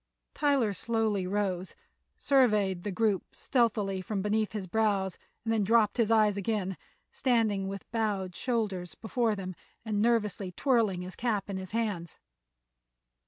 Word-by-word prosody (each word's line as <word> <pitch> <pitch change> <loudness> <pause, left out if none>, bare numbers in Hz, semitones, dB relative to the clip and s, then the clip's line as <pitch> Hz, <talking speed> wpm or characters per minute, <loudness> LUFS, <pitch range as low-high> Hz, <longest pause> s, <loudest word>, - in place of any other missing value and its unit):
Tyler 275 -8 +2
slowly 215 -2 0
rose, 190 -2 -2 0.4
surveyed 210 -9 +3
the 205 - -2
group 205 -1 0
stealthily 210 -6 +1
from 195 0 -3
beneath 215 +1 +1
his 210 -3 -3
brows 195 -2 0 0.2
and 225 0 0
then 215 -2 +2
dropped 220 +1 +3
his 230 -3 +2
eyes 215 -3 +4
again, 200 -2 -1 0.4
standing 220 -7 +1
with 195 0 -7
bowed 205 -5 -1
shoulders 205 -8 -2
before 225 0 0
them 185 -2 -5 0.3
and 210 -2 0
nervously 210 -4 +1
twirling 220 -8 +1
his 185 +1 -8
cap 210 -4 -1
in 190 - -3
his 190 -1 -6
hands. 205 -7 -2
210 Hz, 140 wpm, -30 LUFS, 190-225 Hz, 0.4 s, eyes